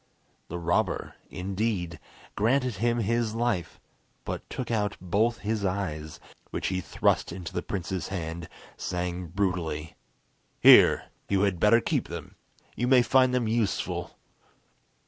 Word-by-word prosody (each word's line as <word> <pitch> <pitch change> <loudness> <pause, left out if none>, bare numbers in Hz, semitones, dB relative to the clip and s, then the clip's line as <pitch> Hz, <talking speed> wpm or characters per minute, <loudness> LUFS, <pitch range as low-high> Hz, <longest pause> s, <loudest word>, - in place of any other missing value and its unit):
The 85 - -5
robber, 85 0 0 0.2
indeed, 95 -2 -2 0.4
granted 125 +1 +1
him 120 +3 +1
his 115 +1 0
life, 115 -8 -1 0.5
but - - -5
took 125 -2 -4
out 105 -2 0
both 105 +6 +1
his 105 0 -2
eyes, 90 -6 -3 0.3
which - - -2
he 95 -1 -1
thrust - - +1
into 85 -1 -7
the - - -1
prince's 95 -1 -3
hand, 85 -2 -5 0.3
saying 90 0 -3
brutally: 85 -4 -2 0.7
"Here, - - +7 0.2
you 100 -1 +2
had 100 -4 +1
better 115 +4 +5
keep - - -1
them! - - -7 0.4
You 120 - -1
may 125 -1 +6
find 130 0 +4
them 125 -3 +1
useful!" 110 -2 -1
100 Hz, 130 wpm, -27 LUFS, 90-115 Hz, 0.7 s, Here